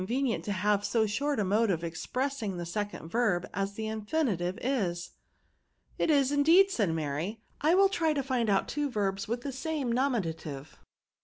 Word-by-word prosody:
229 245 +4 0
venient - - -12
to 205 - -3
have 205 +1 +1
so 225 +1 +2
short 275 +6 -1
a - - +2
mode 210 +4 +2
of 170 -3 0
expressing 220 - -3
the 175 - -4
second 205 -1 -4
verb 195 -3 +1
as 195 +1 -2
the 220 +2 -4
infinitive 215 - -1
is." 190 -10 -1 0.9
It - - +1
is 280 -3 +4
indeed/' 330 +7 +5
said 210 - +1
Mary; 160 +7 -3
" - - -36
I 315 +4 +4
will 390 +1 +6
try 330 -5 +1
to 280 -2 -1
find 250 -4 0
out 195 -1 +2
two 295 0 -1
verbs 200 -4 -1
with 235 +2 -2
the 280 - -3
same 270 -2 -2
nomiua^ 235 - +1
tive." 145 -2 -9
220 Hz, 190 wpm, -29 LUFS, 185-275 Hz, 0.9 s, will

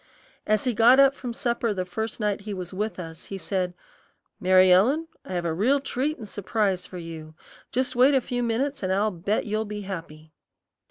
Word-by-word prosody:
As 215 -1 +2
he 250 - 0
got 235 +4 +6
up 275 0 +6
from 250 -3 -6
supper 235 -2 -1
the 185 -1 -2
first 220 +6 -4
night 210 -1 -1
he 205 0 -5
was 180 -1 -6
with 210 0 -3
us, 165 -1 -8
he 195 - -6
said, 185 -2 -2 0.6
"Mary 185 0 +5
Ellen, 265 - +4 0.2
I - - -7
have 175 -1 -2
a 165 - 0
real 245 - +2
treat 275 +3 -2
and 220 - -9
surprise 200 -2 -1
for 185 - -9
you. 160 -2 -8 0.4
Just 255 0 -1
wait 260 +3 +5
a - - +5
few 245 0 -3
minutes, 245 +5 -1
an' 185 - -2
I'll 205 +3 +2
bet 185 +4 -1
you'll 215 0 -1
be 210 -1 -6
happy." 160 -5 -8
210 Hz, 205 wpm, -25 LUFS, 185-240 Hz, 0.6 s, got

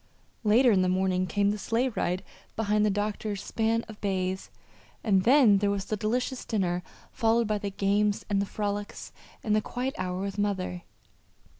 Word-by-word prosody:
Later 235 +4 +5
in 190 -3 +4
the 185 - +2
morning 185 0 +1
came 200 +1 +2
the 210 - -4
sleigh 235 +6 0
ride 180 -5 -2 0.3
behind 210 -1 +1
the 210 - +3
doctor's 205 0 -2
span 225 +1 0
of 215 -1 -12
bays, 190 -1 -2 0.5
and 195 -4 +2
then 240 -6 +6
there 200 0 +1
was 200 -1 -1
the 215 - -2
delicious 245 +5 -1
dinner 180 -5 -1 0.3
followed 230 0 +2
by 210 -1 0
the 200 - -3
games 200 +1 +1
and 200 -1 +1
the 200 - -2
frolics 205 0 -4 0.3
and 210 -1 +2
the 215 - +3
quiet 255 +4 -3
hour 180 0 -2
with 200 +1 -4
mother. 190 -3 -1
205 Hz, 175 wpm, -28 LUFS, 190-220 Hz, 0.5 s, then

